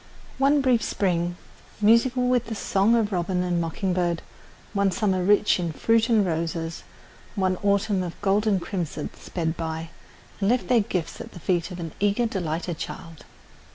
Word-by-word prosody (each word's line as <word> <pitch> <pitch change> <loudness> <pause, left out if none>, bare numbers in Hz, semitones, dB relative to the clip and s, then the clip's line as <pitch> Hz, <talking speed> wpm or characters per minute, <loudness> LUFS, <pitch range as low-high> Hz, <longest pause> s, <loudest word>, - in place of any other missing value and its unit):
One 280 +1 +4
brief 250 -4 +3
spring, 175 -4 0 0.4
musical 235 +4 +4
with 250 -2 +2
the 225 - -4
song 200 +2 +2
of 220 -2 +1
robin 180 0 0
and 175 -1 0
mocking 180 +3 -1
bird, 175 -2 0 0.5
one 200 -1 +2
summer 190 -3 0
rich 205 +1 +4
in 170 -2 -1
fruit 225 +8 +2
and 220 -4 +4
roses, 165 -1 -2 0.5
one 185 -2 +1
autumn 200 0 +1
of 175 -2 -6
gold 205 +2 +1
and 200 -3 +3
crimson 170 -5 -4
sped 165 -2 -3
by 160 0 -4 0.5
and 195 0 +1
left 250 +1 +1
their 245 -2 +5
gifts 180 -5 -3
at - - -10
the - - -9
feet 175 +1 0
of 180 -1 -7
an 165 -2 -5
eager, 205 +4 +2
delighted 175 -5 -3
child. 165 -2 -8
190 Hz, 170 wpm, -25 LUFS, 170-215 Hz, 0.5 s, their